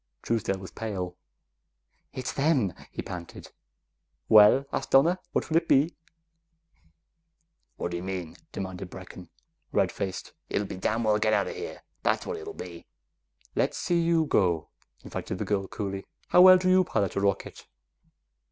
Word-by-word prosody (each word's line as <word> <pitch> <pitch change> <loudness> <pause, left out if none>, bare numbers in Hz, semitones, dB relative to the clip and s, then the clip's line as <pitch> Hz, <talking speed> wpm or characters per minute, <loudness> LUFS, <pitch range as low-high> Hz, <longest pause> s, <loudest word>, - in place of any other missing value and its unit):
Truesdale's 110 -4 0
was 95 - -9
pale. 95 -5 -4 1.0
"It's 130 -1 -4
them!" 135 - +2 0.2
he - - -5
panted. 85 -2 -8 0.8
"Well," 110 +6 +7
asked - - -2
Donna, 165 +7 +5
"what - - -1
will 160 - +2
it 165 0 +1
be?" 145 +5 +4 1.9
"Whaddya 85 0 -3
mean?" 90 -3 -5 0.2
demanded 95 -1 -6
Brecken, 90 -2 -10 0.4
red - - +2
faced. 95 -2 -5 0.2
"It'll 105 - 0
be - - -6
get 95 - -8
dam' 115 +4 0
well 105 -1 +3
outa 110 -2 +2
here, 440 - -7 0.2
that's - - +1
what 460 - -3
it'll 415 -1 -7
be!" - - -9 0.7
"Let's - - 0
see 175 -1 +1
you 165 -1 +3
go," 90 - +1 0.3
invited - - -5
the - - -3
girl 100 -2 -1
coolly. 100 -2 -5 0.2
"How 180 - +7
well 185 0 +10
do 185 0 -1
you 185 0 +5
pilot 100 - -1
a 100 - 0
rocket?" 100 -1 -2
105 Hz, 150 wpm, -27 LUFS, -, 1.9 s, well